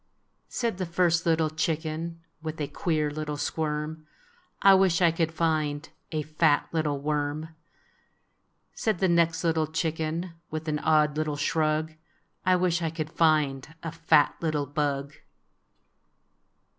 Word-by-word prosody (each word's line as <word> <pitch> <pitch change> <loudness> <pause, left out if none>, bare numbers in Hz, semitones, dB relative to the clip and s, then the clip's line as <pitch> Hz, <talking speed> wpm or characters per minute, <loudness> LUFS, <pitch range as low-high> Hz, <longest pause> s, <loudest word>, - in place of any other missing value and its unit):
Said 230 -6 -2
the 185 - -1
first 170 -1 +2
little 160 -1 +2
chicken, 160 +1 -2 0.2
With 155 0 -5
a 145 - -1
queer 155 -3 -1
little 150 0 -4
squirm, 155 +1 -3 0.6
"I 195 - +9
wish 190 -3 +4
I 170 -2 +5
could 165 -1 0
find 155 -2 0 0.2
A 155 -2 -1
fat 155 0 +2
little 155 -3 0
worm! 150 +1 -2 0.6
" - - -44 0.5
Said 215 -4 0
the 190 - +2
next 170 -1 +2
little 160 -2 +1
chicken, 160 +2 -2 0.2
With 155 +1 -5
an 150 -1 0
odd 150 -1 +3
little 155 -1 -1
shrug, 155 +1 0 0.5
"I 185 - +6
wish 175 -1 +1
I 165 - 0
could 155 -1 -5
find 155 -3 +1
A 165 - -3
fat 160 -3 +3
little 155 -3 0
bug! 140 -1 -2
155 Hz, 140 wpm, -27 LUFS, 150-165 Hz, 0.6 s, I